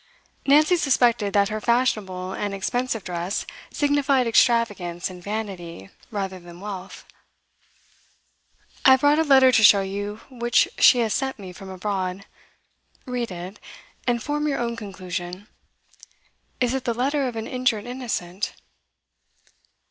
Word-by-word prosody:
Nancy 305 +5 +5
suspected 240 -8 +2
that 200 -1 +3
her 215 0 -3
fashionable 205 -6 0
and 205 -1 -3
expensive 240 +2 -2
dress 175 +2 -3 0.3
signified 285 -3 +2
extravagance 205 -7 +2
and 180 -1 -11
vanity 185 - -6 0.2
rather 195 -3 -4
than 175 0 -13
wealth. 195 -1 -8 1.8
'I - - +7
have 260 - +3
brought 290 +2 +4
a - - +4
letter 265 -3 +6
to 220 -3 +4
show 205 -1 +8
you 205 +2 -5
which 240 -1 +2
she - - +7
has 220 -2 0
sent 265 0 -2
me 190 -3 -9
from 190 +2 -10
abroad. 190 0 -3 0.8
Read 250 -3 -3
it, 180 +2 -8 0.5
and 240 -2 +1
form 295 +1 -1
your 280 - 0
own 235 -1 -2
conclusion. 185 -3 -6 1.1
Is 250 -1 +1
it 265 -1 -3
the 235 - 0
letter 275 +3 0
of 245 - -5
an 225 0 -4
injured 250 -5 0
innocent? 220 -7 -4
215 Hz, 135 wpm, -24 LUFS, 190-255 Hz, 1.8 s, show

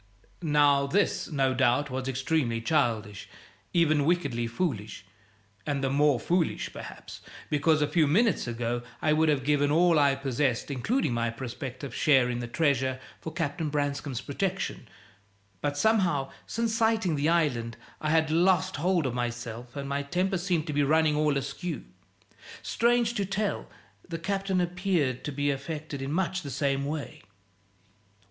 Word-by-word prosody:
Now, 145 -3 +3
this, 200 +7 +1
no 135 -4 +1
doubt, 130 +2 +2
was 130 0 -3
extremely 130 -2 0
childish, 115 -6 -1 0.4
even 155 -4 +3
wickedly 140 -8 0
foolish, 115 - -3 0.6
and 140 -2 -2
the 135 - +1
more 145 -2 +3
foolish, 170 +5 0
perhaps, - - -9 0.3
because 150 +1 +3
a - - +1
few 160 -2 +3
minutes 205 - +2
ago 120 0 -2 0.2
I 155 - +2
would 160 +1 +3
have 145 -3 +1
given 145 +1 +2
all 165 +1 +4
I 140 -1 +4
possessed, 135 -1 -1
including 140 - 0
my 115 0 0
prospective 130 +2 -6
share 130 -5 +4
in 120 - -3
the 120 - -4
treasure, 130 -2 +1 0.2
for 160 - -6
Captain 160 -1 -2
Branscome's 145 -3 -2
protection. 185 +8 -3 0.7
But 145 0 -1
somehow, 180 -10 +2 0.2
since 230 0 -1
sighting 225 -6 +2
the 145 +2 +1
island, 125 -9 +1 0.2
I 155 - -1
had 160 -1 +2
lost 185 +2 +3
hold 175 0 +1
of 130 - -1
myself, 120 0 -4
and 140 -1 -4
my 140 +1 -1
temper 180 +6 -1
seemed 175 -3 0
to 150 - -4
be 145 - +2
running 155 +1 +3
all 150 -1 +2
askew. 160 - -4 0.8
Strange 235 0 +2
to 205 - -1
tell, 195 +2 -2 0.4
the 165 - -3
Captain 195 +2 -1
appeared 175 -7 0
to 150 - -2
be 145 +1 0
affected 145 +1 -5
in 135 +1 -3
much 185 +2 0
the 145 - -7
same 140 0 0
way. 150 0 -5
145 Hz, 155 wpm, -28 LUFS, 130-170 Hz, 0.8 s, all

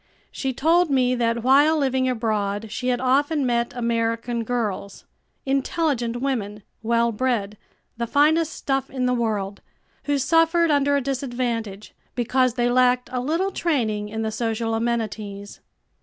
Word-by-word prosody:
She 270 - -2
told 330 +6 +2
me 255 -2 +2
that 235 -1 0
while 285 +5 +5
living 260 -2 +1
abroad 215 -3 -2
she 250 +3 -4
had 245 -1 +1
often 280 +3 +1
met 235 -1 0
American 230 0 -1
girls 215 -4 -3 0.4
intelligent 270 -3 -1
women, 210 -7 -3 0.2
well 235 +1 +1
bred, 215 -3 -1 0.4
the 235 0 -2
finest 310 +5 +3
stuff 270 -1 -2
in 255 -2 -2
the 250 - +2
world 210 -5 -2 0.4
who 290 -1 +1
suffered 330 +4 +3
under 285 0 +3
a 280 - +1
disadvantage, 240 -6 -3 0.2
because 255 0 +1
they 240 -1 +1
lacked 250 0 +2
a 250 - -1
little 330 +9 0
training 220 - -1
in 220 +1 -3
the 220 - -2
social 225 0 -2
amenities. 215 -3 -3
245 Hz, 140 wpm, -23 LUFS, 225-275 Hz, 0.4 s, while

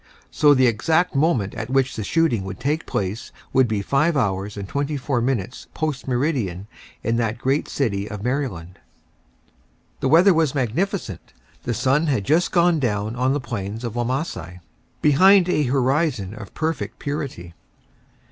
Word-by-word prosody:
So 145 -1 +5
the 130 -1 +4
exact 160 +10 +2
moment 135 - +1
at 115 0 -5
which 130 0 +1
the 110 - -4
shooting 155 -5 +1
would 95 -1 -7
take 150 +4 -1
place 100 +4 -3 0.2
would 130 -1 +4
be 105 -3 -2
5 150 +7 +1
hours 100 -3 -1
and 100 -1 -5
24 140 -1 -1
minutes 125 -1 -2
post 150 -5 -3
meridian 120 - -1 0.4
in 115 0 0
that 115 -1 -1
great 135 +4 0
city 105 -7 -1
of 105 -1 -7
Maryland. 110 - -3 1.2
The 135 - 0
weather 175 +6 +6
was 160 -4 +1
magnificent. 135 - -2 0.3
The 120 - -1
sun 140 +7 +2
had 130 -9 +1
just 160 - +2
gone 170 -2 +3
down 110 -3 -1
on 130 +2 +1
the 145 - 0
plains 110 -3 -5
of 115 -3 -4
Wamasai, 120 - -3 0.4
behind 185 +6 +6
a 150 -5 +1
horizon 130 - 0
of 110 -3 -10
perfect 150 -10 -3
purity. 140 - -5
130 Hz, 155 wpm, -22 LUFS, 105-150 Hz, 1.2 s, weather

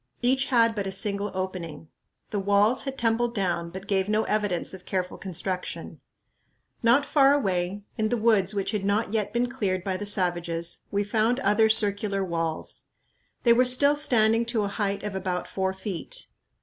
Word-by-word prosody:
Each 260 +2 +2
had 230 -3 +4
but 200 -3 -3
a - - -3
single 200 +1 -1
opening. 175 -5 -5 0.4
The 205 - -1
walls 205 +6 +2
had 270 -1 -4
tumbled 235 0 0
down, 175 -4 -1
but 190 +2 -8
gave 195 -1 0
no 215 +1 +2
evidence 205 -5 -1
of 190 -1 -10
careful 180 -1 -3
construction. 185 0 -5 0.8
Not 240 +5 +4
far 280 -1 +4
away, 195 -5 -1 0.2
in 215 0 +1
woods 215 -3 +2
which 195 -1 -1
had 210 -3 -2
not 200 +1 0
yet 210 -2 0
been 240 +2 +1
cleared 200 -8 -2
by 190 -1 -2
the 205 +2 -5
savages, 175 -3 -1
we 205 0 0
found 220 +4 +1
other 220 -3 +3
circular 205 -2 +2
walls. 165 -2 -3 0.5
They 235 - +6
were 245 +2 +4
still 270 +3 +4
standing 230 -5 +3
to 230 -2 -1
a 200 - -1
height 200 -1 -2
of 210 -1 -4
about 185 -2 -3
four 190 -1 -1
feet. 195 - -5
205 Hz, 175 wpm, -26 LUFS, 190-230 Hz, 0.8 s, They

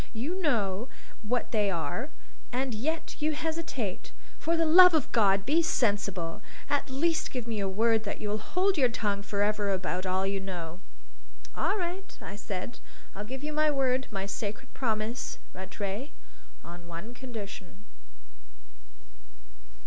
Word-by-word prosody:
You 305 +12 -2
know 225 - +1 0.3
what 235 +3 -1
they 210 -3 +3
are, 195 - -2 0.4
and 260 0 0
yet 310 +9 -2
you 310 +1 +2
hesitate! 310 - -3 0.3
For 335 +1 +1
the 330 - +3
love 355 +2 +9
of 305 - +1
God 195 -3 +4
be 315 +7 +4
sensible; 200 - +1 0.3
at 285 0 +1
least 315 +5 +1
give 250 -3 -4
me 230 -2 -2
your 195 -1 0
word 220 +3 +3
that 205 - -3
you'll 210 0 -1
hold 365 - +2
your 255 -3 +5
tongue 205 -3 -1
for 200 0 0
ever 210 -1 +1
about 185 -1 -1
all 185 +1 +1
you 195 0 0
know." 175 -3 -5 0.8
"All - - +1
right," 370 +1 -4
I 200 - -7
said. 205 +2 -5 0.3
"I'll 205 +1 -5
give 265 +5 -6
you 305 +1 -2
my 305 0 +4
word 265 -2 +2
my 195 -2 -2
sacred 205 +1 -4
promise, 225 -1 -1 0.2
Rattray 195 +7 -4 0.6
on 175 0 -10
one 170 +8 -7
condition." 205 -6 -8
220 Hz, 150 wpm, -30 LUFS, 195-285 Hz, 0.8 s, love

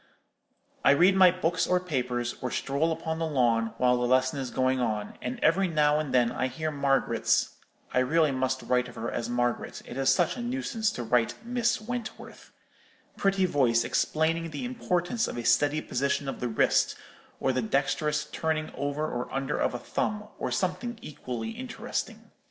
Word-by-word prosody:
I - - +7
read 185 +4 +5
my 190 -1 +8
books 175 -1 0
or 180 - +3
papers, 125 -8 -2
or 125 - -2
stroll 140 +7 0
upon 160 0 -3
the 165 - 0
lawn, 115 -6 +1
while 125 0 +3
the 125 0 0
lesson 130 +2 +2
is 130 -2 -3
going 130 +1 +1
on, 110 -4 -2
and 125 +1 -4
every 185 +5 +4
now 150 -2 +3
and 155 -3 -3
then 120 -2 +3
I 130 - -1
hear 155 +5 -3
Margaret's—I 135 -3 0
really 155 +4 +3
must 130 0 -1
write 125 0 +1
of 125 - -12
her 115 - -4
as 115 - -3
Margaret; 120 0 -1
it 120 - -8
is 135 0 +2
such 135 - +3
a - - -4
nuisance 240 -3 -1
to 120 - -4
write 115 0 +1
Miss 240 -1 +1
Wentworth—pretty 215 -4 -4
voice 125 -9 +2
explaining 165 +6 0
the 150 +8 -5
importance 230 -2 -1
of - - -5
a 120 - -4
steady 145 +6 +3
position 140 +1 -1
of 135 - -4
the 125 - -1
wrist, 110 - +2 0.4
or 130 - +1
the 130 - 0
dexterous 150 +5 0
turning 155 -1 -2
over 145 +2 -2
or 125 -5 -4
under 135 +1 -2
of - - 0
a - - -1
thumb, 210 - -3
or - - -2
something 230 +6 -2
equally 130 - -5
interesting. 250 +2 -5
140 Hz, 175 wpm, -28 LUFS, 125-175 Hz, 0.4 s, my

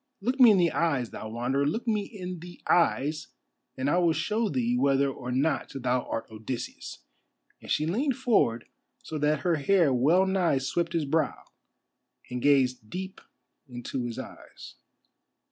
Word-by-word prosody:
Look 250 +7 -2
me 250 -3 +9
in 205 - +5
the 175 -2 +3
eyes, 145 -8 0
thou 110 - -7
Wanderer, 120 +5 -1
look 225 +11 -2
me 215 -2 +2
in 185 -5 -7
the 175 +1 -11
eyes, 155 -2 +2 0.5
and 130 +1 -1
I 170 +5 +3
will 170 -2 +3
show 215 +5 -1
thee 125 -5 0
whether 135 +2 +3
or 125 -1 -6
not 140 +5 0
thou 125 -1 0
art 115 - -3
Odysseus," 110 +3 -6 0.6
and - - -12
she 155 - +1
leaned 245 - 0
forward 205 - +2 0.4
so 155 - -5
that 150 0 +1
her 175 -3 +1
hair 165 -1 +3
well 155 +10 +4
nigh 185 -6 +2
swept 165 +6 -2
his 165 -3 0
brow, 155 +3 -1 0.9
and 125 0 -3
gazed 130 -5 +2
deep 190 - -6 0.5
into 120 +1 -5
his 120 -1 -5
eyes. - - -10
150 Hz, 160 wpm, -27 LUFS, 125-180 Hz, 0.9 s, me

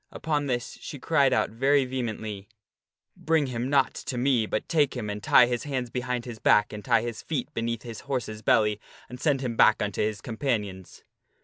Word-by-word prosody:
Upon 150 -2 -2
this 120 -2 -3
she 145 - -7
cried 140 0 +2
out 130 - +1
very 135 +4 +2
vehemently, 110 -5 -5 0.3
" - - -65
Bring 160 -2 +1
him 125 -1 -3
not 140 -2 +3
to 125 - -5
me, 125 -3 +2
but 110 - -2
take 150 -5 +2
him 105 -4 -3
and 105 0 -5
tie 125 - +6
his 120 +1 -2
hands 130 -4 -3
behind 125 -1 -3
his 115 -3 -8
back 105 0 +3
and 105 -1 -7
tie 115 -3 +3
his 120 -2 -5
feet 145 -6 -4
beneath 115 -1 -3
his 115 -3 -7
horse's 120 -6 -4
belly, 105 -1 +3 0.3
and 125 +1 -9
send 145 -4 +2
him 120 -3 -3
back - - +5
unto 105 -1 -2
his 105 -1 -1
companions." 105 -6 -4
120 Hz, 200 wpm, -26 LUFS, 110-135 Hz, 0.3 s, tie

